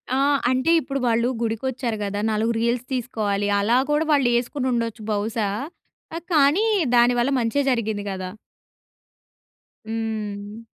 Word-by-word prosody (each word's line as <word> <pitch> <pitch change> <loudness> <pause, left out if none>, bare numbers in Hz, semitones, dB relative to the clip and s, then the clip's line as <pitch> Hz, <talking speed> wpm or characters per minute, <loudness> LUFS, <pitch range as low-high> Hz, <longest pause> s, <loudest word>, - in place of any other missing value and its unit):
ఆ! - - +1 0.3
అంటే 260 +5 +2
ఇప్పుడు 275 -2 -3
వాళ్ళు 235 +1 +2
గుడికొచ్చారు 235 +1 -2
కదా! 205 0 -3
నాలుగు 220 +2 +1
రీల్స్ 235 +1 0
తీసుకోవాలి 215 -5 -1
అలా 225 +5 +3
కూడా 300 +2 +2
వాళ్ళే‌సు‌కునుండొచ్చు 240 -3 0
బహుశా! 210 0 -1 0.7
ఆహ్, 340 - -9
కానీ 305 +7 +4 0.3
దాని 240 +1 +5
వల్ల 240 +3 +2
మంచే 235 +4 +1
జరిగింది 220 -4 -1
కదా! 185 -1 -5 1.6
హ్మ్. 220 -1 -5
230 Hz, 115 wpm, -23 LUFS, 215-255 Hz, 1.6 s, దాని